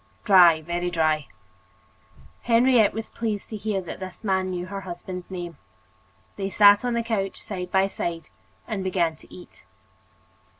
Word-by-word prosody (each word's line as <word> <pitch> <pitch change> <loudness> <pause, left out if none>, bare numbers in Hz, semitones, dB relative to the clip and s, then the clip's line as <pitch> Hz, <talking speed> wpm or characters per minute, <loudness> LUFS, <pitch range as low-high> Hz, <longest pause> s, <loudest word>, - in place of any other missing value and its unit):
"Dry, 175 -7 +6
very 175 +2 -2
dry." 155 -3 0 1.1
Henriette 235 -2 +4
was 225 0 -5
pleased 215 -3 -4
to 220 - -6
hear 210 -2 -2
that 175 - -8
this 185 +1 -9
man 190 -2 0
knew 180 -1 -4
her 195 +1 -6
husband's 180 0 -8
name. 175 -4 -6 0.8
They 195 -1 -2
sat 205 +1 +6
on 245 -1 -1
the 235 - 0
couch, 205 -4 -2
side 180 -3 -6
by 190 0 +3
side, 170 -4 -4 0.4
and 210 -4 -3
began 175 -4 0
to - - -20
eat. 180 - -14
190 Hz, 155 wpm, -24 LUFS, 175-210 Hz, 1.1 s, Dry